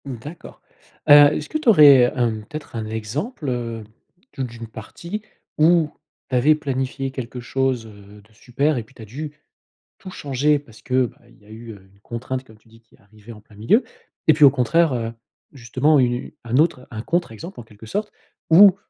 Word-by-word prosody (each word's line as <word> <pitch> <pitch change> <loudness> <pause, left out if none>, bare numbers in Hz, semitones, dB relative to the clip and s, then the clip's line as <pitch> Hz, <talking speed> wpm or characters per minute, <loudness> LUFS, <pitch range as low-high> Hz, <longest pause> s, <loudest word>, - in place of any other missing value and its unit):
Mmh 135 -2 -5
d'accord. 150 +9 -11 0.5
Heu, 145 0 +9
est-ce 150 - -4
que - - -1
tu 305 - +2
aurais, 140 - +7
hem, 115 -4 -1
peut-être, 155 -2 -9
un 110 -1 -3
exemple, 130 - -4
heu, 115 -2 -4 0.5
d'une 115 -3 -5
partie 170 - -8 0.4
où 160 0 +4 0.4
tu 130 - -1
avais 145 +5 +4
planifié 135 -2 -3
quelque 130 -1 -7
chose, 130 -1 -1
heu, 105 -1 -15
de 110 +2 -26
super 135 +6 -1
et 120 - -3
puis 130 +5 -24
tu - - -13
as - - -8
dû 145 +8 -7 0.7
tout - - -10
changer 145 -1 0
parce 115 -6 -18
que, 130 0 +1
bah, - - -11
il - - -22
y 105 - -24
a - - -19
eu, 115 +1 -10
heu, 95 -2 -17
une 100 - -26
contrainte, 130 +4 -5
comme 110 -4 -18
tu 110 - -29
dis, 115 0 -20
qui 110 - -26
est - - -31
arrivée 105 +2 -16
en 105 -2 -12
plein 105 0 -21
milieu? 115 - +2 0.4
Et 155 - +7
puis 150 +1 +2
au 140 - +10
contraire, 140 +4 +2
heu, 115 -2 -3 0.4
justement, 135 +4 +1
u 130 - +5
une 120 0 -3
un 120 +1 -1
autre 150 -4 +1
un 110 -2 -5
contre 175 -3 -1
exemple, 165 - -9
en - - -8
quelque 110 0 -15
sorte 205 - -3 0.4
où 190 +3 +8
125 Hz, 210 wpm, -21 LUFS, 115-150 Hz, 0.7 s, au